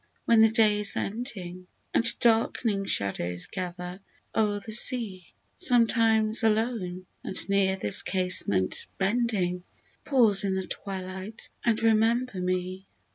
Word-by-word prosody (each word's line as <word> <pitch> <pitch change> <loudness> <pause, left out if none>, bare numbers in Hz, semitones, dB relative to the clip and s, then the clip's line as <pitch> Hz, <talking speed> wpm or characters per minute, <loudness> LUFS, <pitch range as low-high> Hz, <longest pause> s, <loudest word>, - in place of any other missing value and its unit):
when 230 -1 +5
the 225 - +6
day 215 -2 +3
is 210 0 +2
ending, 190 -6 -5 0.3
And - - +3 0.2
dark'ning 225 -3 +1
shadows 90 -3 -1
gather 180 0 -6 0.4
o'er 210 -2 +1
the 220 - -8
sea; 220 - +2 0.3
Sometimes 225 -2 +3
alone, 215 -5 -1 0.2
and 190 - -6
near 195 -1 +2
this 105 - 0
casement 180 - -1
bending, 195 -4 0 0.4
Pause 225 -8 +3
in 190 -1 0
the 190 -1 -2
twilight 190 +2 -7
and 225 -1 +1
remember 225 -1 +2
me 185 +1 -3
200 Hz, 120 wpm, -27 LUFS, 185-225 Hz, 0.4 s, the